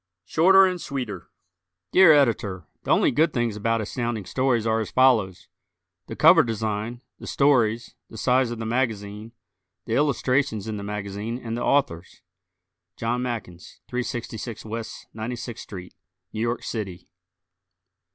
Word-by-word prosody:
Shorter 190 - +6
and 180 -2 -2
Sweeter 120 - -5 0.6
Dear 185 -3 +7
Editor: 110 - +2 0.2
The - - -6
only - - +4
good 155 +4 +2
things 120 -3 0
about 115 +2 0
Astounding 115 -1 -3
Stories 125 +1 0
are 110 0 +1
as 110 - -3
follows: 115 -8 +2 0.6
The - - -6
cover - - +7
design, 110 +1 -3 0.2
the - - -9
stories, 120 -5 +2 0.2
the 110 - -11
size 125 +1 +2
of 120 - -5
the 110 - -5
magazine, 110 -3 -2 0.5
the 115 - -3
illustrations 135 -5 +1
in 110 -1 -3
the 100 - -6
magazine 105 +2 -4
and 115 -2 -5
the 120 - -4
Authors. 90 -12 0 0.7
John 120 +2 -1
Mackens, 110 -9 -6
366 120 -2 -4
W. 115 +1 -4 0.3
96th 120 0 -6
St., 90 -3 -9 0.4
New 110 - -3
York 120 +1 -1
City. 95 -6 -5
115 Hz, 140 wpm, -24 LUFS, 105-125 Hz, 0.7 s, Dear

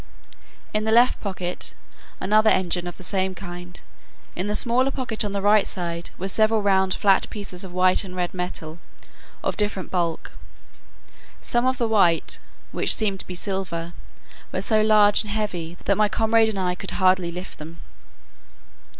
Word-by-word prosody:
In 215 0 0
the 220 - 0
left 240 +3 +4
pocket, 185 -3 -4 0.4
another 215 +3 +3
engine 175 -2 +1
of 175 - -7
the - - -11
same 190 0 0
kind. 175 -1 -8 0.6
In 185 +3 -3
the 210 - -1
smaller 250 +4 +4
pocket 255 -5 -2
on 205 - -3
the 200 -1 -3
right 205 0 +4
side, 170 -2 -3
were 190 - -4
several 215 +2 +2
round 190 -1 +2
flat 195 -2 +2
pieces 200 -4 -5
of 190 - -8
white 185 +2 +3
and 185 -2 -9
red 180 -1 -2
metal, 175 -3 -5 0.6
of - - -1
different 205 -3 -2
bulk; 170 -3 -2 1.1
some 240 +1 0
of 260 0 +1
the 235 - 0
white, 180 -7 +2 0.3
which - - +3
seemed 200 -3 -1
to - - -5
be 180 - -6
silver, 175 -3 -3 0.6
were - - -3
so 215 -1 +3
large 210 -1 +5
and 215 - -6
heavy, 180 -6 -3
that 200 - +2
my 210 -1 +3
comrade 225 0 +3
and 215 - -4
I 180 -1 0
could 180 - -6
hardly 185 -2 +3
lift 180 +2 -8
them. 160 +2 -10
190 Hz, 170 wpm, -23 LUFS, 180-215 Hz, 1.1 s, large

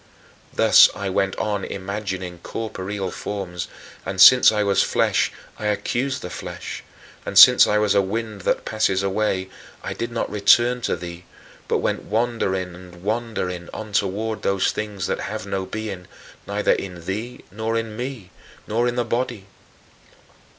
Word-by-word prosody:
Thus - - +7
I 100 -2 -3
went 95 0 0
on 105 -2 -2
imagining 95 -2 -5
corporeal 100 -1 -5
forms, 95 -4 -5 0.4
and, 95 0 -5
since 125 +5 +9
I 105 -1 +1
was 100 -1 +3
flesh - - +1 0.3
I 105 - -2
accused 130 +5 -1
the 90 - -6
flesh, - - -7 0.4
and, - - -4
since - - +9
I 105 - +2
was 105 -1 +2
"a 100 - +4
wind 105 +1 -4
that - - 0
passes 100 -3 +1
away," 95 -1 -1 0.3
I - - -4
did 115 - -4
not 115 - -2
return 120 +4 +3
to - - +1
thee 85 0 -9 0.4
but - - +1
went - - -1
wandering 105 -5 -1
and 90 0 -13
wandering 105 -5 -3
on 110 -1 -7
toward 105 +3 -1
those 100 -1 +1
things 105 -4 -4
that - - -2
have 110 -1 -5
no 95 -1 -3
being 105 -5 -6 0.4
neither - - +1
in 90 -3 -3
thee 110 +6 -5
nor 110 +3 -2
in 115 -1 -4
me, 120 -6 -6 0.3
nor 115 +3 0
in 120 - -1
the 120 -1 0
body. 120 -3 -2
100 Hz, 155 wpm, -22 LUFS, 95-110 Hz, 0.4 s, since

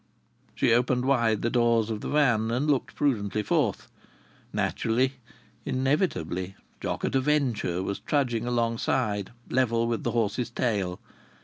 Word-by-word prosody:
She - - +3
opened 125 +1 +2
wide 120 -6 +2
the 120 - +1
doors 115 -2 +2
of 105 -1 -3
the - - -4
van 120 -7 +3
and 125 +5 0
looked 130 -3 0
prudently 105 -7 0
forth. - - 0 0.6
Naturally, 125 +4 0 0.5
inevitably, 130 - -1 0.2
Jock - - -2
at - - -2
a 135 - +3
Venture 125 -11 0
was 100 - -3
trudging 120 -5 0
alongside, 115 -3 0 0.2
level 115 -2 +2
with 115 -1 -2
the - - 0
horse's 115 +1 0
tail! 105 -7 -1
120 Hz, 135 wpm, -27 LUFS, 110-130 Hz, 0.6 s, She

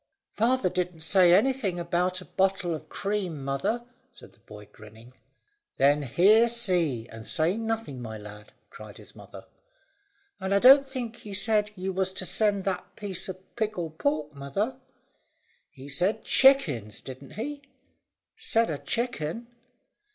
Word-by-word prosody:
"Father 240 -1 +2
didn't 180 -2 -3
say 180 +1 +4
anything 205 -2 +2
about 180 +2 -1
a - - -11
bottle 190 -2 0
of 155 0 -8
cream, 190 -8 -3
mother," 140 - -1 0.3
said 240 - -15
the - - -26
boy, 105 -1 -13
grinning. 110 +4 -16 0.6
"Then 145 +2 +4
hear, 200 - +4
see, 175 - 0
and 110 -1 -10
say 170 +2 +1
nothing, 225 - -4
my 110 -2 -6
lad," 105 0 -12 0.2
cried - - -11
his - - -15
mother. - - -12 0.9
"And 190 +1 -1
I - - +6
don't 270 +5 +7
think 245 -4 -5
he 205 -2 -7
said 210 +1 +2
you 190 0 -4
was 190 0 -1
to 185 - -3
send 205 0 +1
that 185 -2 -4
piece 190 -3 -4
of 185 0 -10
pickled 180 -8 -3
pork, 150 +1 -1
mother." 195 - -3 0.9
"He 135 -3 -13
said 175 +9 0
chickens, 150 - +3
didn't 130 0 -10
he?" 285 +6 -5 0.7
"Said 230 - +1
a - - -4
chickun." 230 -3 -3
185 Hz, 145 wpm, -27 LUFS, 145-220 Hz, 0.9 s, don't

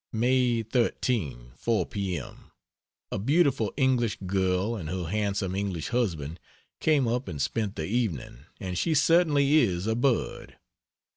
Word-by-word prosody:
May 120 0 +2
13, 110 - -1
4 110 -7 +1
p. 95 -4 -3
m. 70 - -10 0.6
A - - -2
beautiful 135 - +2
English 130 -5 +2
girl 95 +3 0
and 85 -8 -5
her 90 0 -3
handsome 100 0 -1
English 95 -5 -2
husband 85 - -1 0.4
came 150 -5 +3
up 120 +1 -1
and 75 -6 -5
spent 100 +9 -1
the 80 - -3
evening, 85 - -2
and 90 -1 -3
she 160 - +1
certainly 150 -2 +4
is 90 -8 +1
a 110 - +1
bird. 120 +1 -1
105 Hz, 140 wpm, -27 LUFS, 90-125 Hz, 0.6 s, certainly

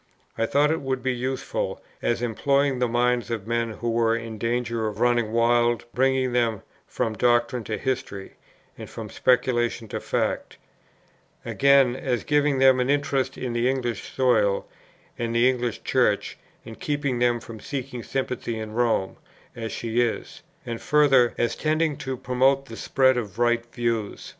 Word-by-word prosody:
I 115 - 0
thought 145 +4 +3
it 160 - -1
would 130 -2 -3
be 130 -1 +1
useful, 130 +2 -3 0.2
as 120 0 0
employing 140 +3 +1
the 125 - +2
minds 120 -1 +1
of 110 -4 -3
men 115 0 -1
who 115 +2 -3
were 115 0 +2
in 115 -2 -6
danger 115 -1 -1
of 105 0 -6
running 120 -2 +2
wild, 120 0 +2
bringing 130 -1 +1
them 115 -4 0 0.2
from 110 - -2
doctrine 120 +1 +1
to 110 - -3
history, 130 -7 -4 0.4
and - - -9
from - - -8
speculation 120 -2 +1
to - - -3
fact; - - -2 0.9
again, 140 -3 +4
as 130 -2 -2
giving 145 -1 +2
them 130 -1 +5
an 125 +1 0
interest 140 -2 0
in 125 -2 -4
the 120 +2 +1
English 120 -5 -3
soil, 110 -7 +2 0.5
and 115 0 -2
the 120 +2 +5
English 125 -3 -1
Church, - - +1 0.3
and 115 - -10
keeping 145 -4 -1
them 120 -1 +2
from 115 -1 -10
seeking 130 0 -5
sympathy 125 -2 -3
in 110 -1 -6
Rome, 115 -5 0 0.4
as 115 -1 -5
she 115 +1 -1
is; 120 -2 -3 0.2
and 115 -1 -5
further, 135 -5 +4
as 120 - 0
tending 155 0 0
to 130 -1 -4
promote 130 +3 +2
the 115 - -9
spread 130 +2 +2
of 105 -4 -4
right 120 0 +2
views. 115 -4 -2
120 Hz, 160 wpm, -24 LUFS, 115-130 Hz, 0.9 s, them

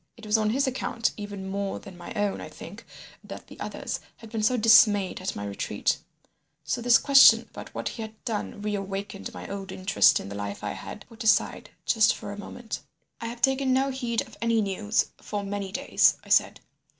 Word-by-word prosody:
It 225 - -12
was 210 +1 +2
on 215 -1 +2
his 270 +5 +2
account 255 -3 -1
even 205 -2 -6
more 195 0 -3
than 195 -3 -12
my 175 0 -10
own, 205 -1 -1
I - - -7
think, - - -11 0.4
that - - -9
the - - -14
others - - -4 0.2
had 225 -2 -13
been 225 -2 -2
so 245 +4 +2
dismayed 210 -4 +5
at 185 - -3
my 100 - -5
retreat. 100 -1 -1 0.6
So 165 +11 -2
this 235 -1 +6
question 275 -1 +7
about - - -10
what - - -2
he 230 - -7
had 220 0 -7
done 210 -3 -4
reawakened 195 -1 -4
my - - -8
old 195 -1 -6
interest 190 +1 +4
in - - -8
the 100 - -7
life 100 0 -5
I 105 - -2
had 210 - -8
put 230 +1 -9
aside 220 - +2 0.2
just 220 -2 +4
for 205 -2 -7
a 205 - -7
moment. 225 +2 -6 0.4
"'I 230 - -4
have 235 +1 -8
taken 265 -1 +3
no 270 +1 +2
heed 240 -4 -1
of - - -16
any 230 -1 +2
news 210 +1 0
for 205 -1 -4
many 200 -1 -4
days,' - - +3
I - - -15
said. - - +3
210 Hz, 205 wpm, -26 LUFS, 195-230 Hz, 0.6 s, question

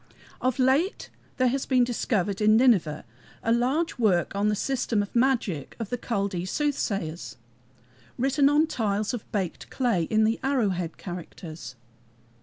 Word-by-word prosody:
Of 255 -1 0
late 270 +9 +1 0.3
there 255 -1 +3
has 270 +2 -2
been 255 -2 +4
discovered 210 -5 -1
in 215 +1 +5
Nineveh 200 - +3 0.4
a 225 - +1
large 260 +7 0
work 195 -5 +2
on 200 +1 +1
the 210 - +2
system 235 -3 0
of 200 - -11
magic 235 - 0
of 225 -3 -4
the 245 - 0
Chaldee 200 -6 -2
soothsayers, 195 - -2 0.8
written 275 +2 +3
on 295 +2 +4
tiles 215 -6 -1
of 240 - -6
baked 190 -5 -3
clay, 230 -11 0
in 215 +5 +2
the 225 +1 +1
"arrow 265 -6 +2
head" 175 -3 -3
characters. 165 -7 -8
220 Hz, 150 wpm, -26 LUFS, 190-255 Hz, 0.8 s, in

